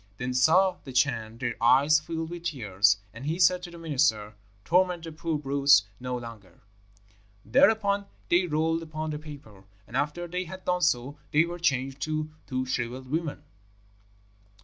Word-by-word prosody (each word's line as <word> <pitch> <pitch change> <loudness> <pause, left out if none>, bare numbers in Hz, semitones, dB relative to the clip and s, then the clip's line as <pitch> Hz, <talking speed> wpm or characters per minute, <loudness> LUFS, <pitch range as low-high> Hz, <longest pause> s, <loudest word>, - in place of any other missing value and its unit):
Then 125 +1 -3
saw 180 +9 +4
the 135 - -9
Chan 120 -4 0
their 120 -1 -2
eyes 140 +6 +5
filled 160 +1 -5
with 175 -1 -8
tears, 105 - +2 0.2
and 115 +3 -10
he 160 +2 -1
said 180 0 +4
to 180 - -8
the 170 - -11
minister, 130 -10 0 0.3
'Torment 180 -1 +2
the 165 - -7
poor 160 0 -3
brutes 140 -4 +4 0.2
no 125 0 -3
longer.' 115 -7 -11 0.8
"Thereupon 215 -6 +3 0.2
they 180 +1 +3
rolled 160 +1 0
upon 155 -1 -5
the 150 - -4
paper, 140 -11 -12 0.2
and 115 - -11
after 150 +6 -1
they 180 +2 -3
had 185 +2 -10
done 180 0 0
so 140 -1 0
they 155 +2 +4
were 175 +1 -6
changed 135 -4 -1
to 155 +1 -2 0.2
two 130 -1 -2
shrivelled 130 0 -4
women." 160 -1 -3
150 Hz, 165 wpm, -27 LUFS, 125-170 Hz, 0.8 s, eyes